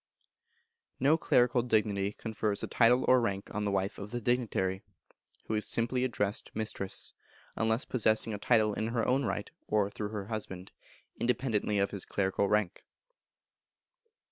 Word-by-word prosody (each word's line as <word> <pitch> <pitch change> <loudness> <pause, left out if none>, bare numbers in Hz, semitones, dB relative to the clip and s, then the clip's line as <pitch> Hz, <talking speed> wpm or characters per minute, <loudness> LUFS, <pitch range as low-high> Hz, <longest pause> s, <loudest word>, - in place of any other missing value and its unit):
No 140 +4 +5
clerical 125 -5 +3
dignity 105 -4 +1
confers 105 -2 -3
a - - -1
title 125 +2 +4
or 130 -1 +6
rank 100 -4 -3
on 105 0 -2
the 100 - 0
wife 95 0 -1
of 100 - -6
the 120 +2 -3
dignitary, 105 -6 0 0.6
who - - -3
is 105 -1 0
simply 120 +2 0
addressed 105 -5 -1
Mistress, 105 -3 -3 0.4
unless 110 +2 +1
possessing 110 -2 +2
a 100 - -4
title 110 -2 +3
in 110 - -2
her 115 0 -1
own 135 +1 +2
right, 105 -2 -3 0.2
or 105 -1 +1
through 105 0 -4
her 105 -2 -5
husband, 100 -4 -5 0.5
independently 120 -4 0
of 100 0 +1
his 100 -3 -2
clerical 100 0 0
rank. 105 -4 0
110 Hz, 150 wpm, -31 LUFS, 100-120 Hz, 0.6 s, or